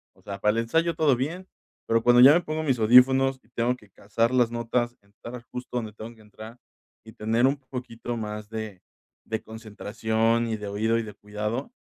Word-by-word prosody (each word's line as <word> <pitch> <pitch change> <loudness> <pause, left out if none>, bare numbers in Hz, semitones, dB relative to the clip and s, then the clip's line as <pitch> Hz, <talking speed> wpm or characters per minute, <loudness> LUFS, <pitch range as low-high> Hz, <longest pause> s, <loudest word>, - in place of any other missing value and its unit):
o - - -24
sea, 100 -1 -7
para 105 +1 +3
el 115 - 0
ensayo 165 +7 +1
todo 150 -5 +3
bien, 165 +9 -4 0.4
pero 115 0 +2
cuando 120 0 +6
ya 135 +3 +10
me 170 - +5
pongo 155 -1 -3
mis 135 -5 0
audífonos 130 +4 +5
y - - -29
tengo 120 +2 0
que 105 -5 -20
cazar 115 +5 -1
las 125 -2 +3
notas, 120 +1 -2
entrar 115 +4 -11
justo 125 0 -7
donde 110 -3 -4
tengo 110 +2 -10
que 110 - -20
entrar 110 +2 -12 0.5
y 110 - -11
tener 115 +3 +1
un 140 +2 0
poquito 125 -3 -7
más 105 -1 -6
de 110 -4 -6 0.5
de 110 -1 -3
concentración 110 +1 -1
y 110 - -1
de 105 - -7
oído 110 +3 0
y 115 - -1
de 105 - -9
cuidado, 105 +5 -4
115 Hz, 205 wpm, -26 LUFS, 110-125 Hz, 0.5 s, ya